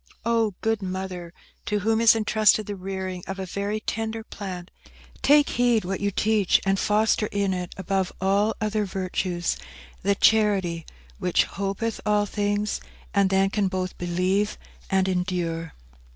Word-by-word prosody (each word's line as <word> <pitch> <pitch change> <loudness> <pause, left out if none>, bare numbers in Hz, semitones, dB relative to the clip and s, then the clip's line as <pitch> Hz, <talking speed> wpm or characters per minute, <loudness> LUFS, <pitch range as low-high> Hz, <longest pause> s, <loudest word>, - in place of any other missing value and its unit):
Oh, 225 -4 +1
good 225 -1 0
Mother, 185 -2 -5 0.4
to 210 -1 0
whom 220 +2 +2
is 230 0 +7
entrusted 215 -1 +3
the 205 - -4
rearing 190 -1 -5
of 195 - -4
a 190 - -4
very 200 +3 -3
tender 225 0 -3
plant, 185 -5 -7 0.5
take 290 0 +5
heed 240 -4 +2
what 190 +1 -2
you 200 - +1
teach, 210 -1 +2
and 195 0 +2
foster 210 0 +2
in 200 -2 0
it, 180 -1 -4
above 190 -1 -1
all 200 +3 +2
other 215 0 0
virtues, 185 -2 -2 0.4
the 200 +1 +2
charity 195 -7 +2 0.3
which 180 -2 +3
'hopeth 200 +3 -3
all 210 -1 +2
things,' 205 0 -1 0.3
and 200 -1 +3
then 195 0 +2
can 205 -2 +1
both 185 -1 -3
believe 185 +4 0 0.3
and 190 -1 +2
endure." 175 -3 -2
195 Hz, 150 wpm, -25 LUFS, 185-215 Hz, 0.5 s, is